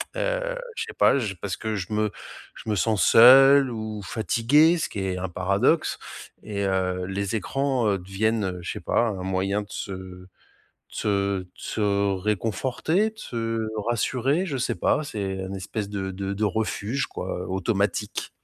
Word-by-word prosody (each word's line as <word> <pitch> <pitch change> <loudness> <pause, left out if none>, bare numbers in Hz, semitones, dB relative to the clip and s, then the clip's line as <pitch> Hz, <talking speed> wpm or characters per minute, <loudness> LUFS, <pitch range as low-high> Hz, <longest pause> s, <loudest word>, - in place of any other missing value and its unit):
heu, - - -1 0.2
je - - -2
sais 450 - -9
pas, 140 - +5
je 105 -6 -3
parce 95 +1 -4
que 110 -1 -3
je 100 +1 -4
me 105 0 +1 0.5
je - - -12
me 105 - +1
sens 105 +1 +1
seul 135 +3 +8
ou 110 -2 -5
fatigué. 120 - +3
Ce - - -2
qui 100 - -5
est 95 -1 -2
un 95 0 -3
paradoxe 100 - +1 0.4
et 100 -2 -4
heu, 90 -1 0
les 100 +2 -2
écrans, 130 +2 0
heu, 100 -2 +1
deviennent, 105 +4 0
heu, 90 -1 -3
je - - -3
sais - - -5
pas 115 - +1
un 95 -3 -4
moyen 95 +2 0
de 105 - -10
se 100 - -5
de 95 -1 -8 0.8
se - - -1 0.3
de 90 - -13
se 100 -2 0
réconforter, 120 - 0
de 220 - -28
se 115 - -3 0.2
rassurer 130 - +1
je 145 -7 -3
sais 125 - -1
pas. 155 - +1
C'est 100 -8 -4
un 95 +1 -5
espèce 100 +2 -4
de 95 -2 -3
de 95 +1 -4
de 105 +2 -3
refuge 110 +4 -1
quoi, - - -5
automatique. 100 +2 -1
105 Hz, 175 wpm, -25 LUFS, 95-125 Hz, 0.8 s, seul